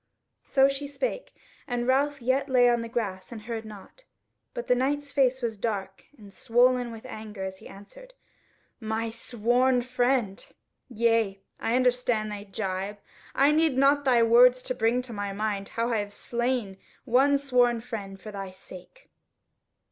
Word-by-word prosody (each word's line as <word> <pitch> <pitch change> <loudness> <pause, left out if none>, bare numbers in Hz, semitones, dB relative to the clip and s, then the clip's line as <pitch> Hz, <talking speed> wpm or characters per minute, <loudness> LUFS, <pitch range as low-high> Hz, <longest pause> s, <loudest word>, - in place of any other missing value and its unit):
So 270 -1 +5
she 275 +1 -3
spake, - - -4 0.4
and 245 -2 -2
Ralph 280 0 +1
yet 265 +3 +1
lay 250 -1 +5
on 240 -1 +2
the 230 - -6
grass 200 -5 -4
and 220 -2 -8
heard 225 -1 -5
nought. 215 - -13 0.5
But 485 - -4
the - - +3
Knight's 285 +3 -1
face 260 -2 +2
was 225 -2 -2
dark 195 -3 -4
and 205 -3 -14
swollen 245 0 +2
with 225 +1 -10
anger 215 -5 -7
as 190 0 -6
he - - -12
answered: - - -14 0.6
"My 225 0 -3
sworn 245 +2 +1
friend! 245 -4 0 0.5
yea, 225 -4 +1 0.2
I 230 - 0
understand 245 -4 +1
thy 205 0 -7
gibe. 195 0 -4 0.4
I 280 +2 +5
need 310 -3 +2
not 280 +1 +4
thy 245 -4 +4
words 245 +2 +6
to 255 - -2
bring 245 +1 +1
to 245 -2 -8
my 205 -1 -4
mind 205 -1 -3
how 230 +1 0
I - - +2
have 205 0 -5
slain 235 -3 -2 0.3
one 275 +3 +4
sworn 250 -4 +2
friend 205 -5 -7
for 210 +3 -9
thy 195 -2 -6
sake." 185 - -14
240 Hz, 165 wpm, -27 LUFS, 210-260 Hz, 0.6 s, words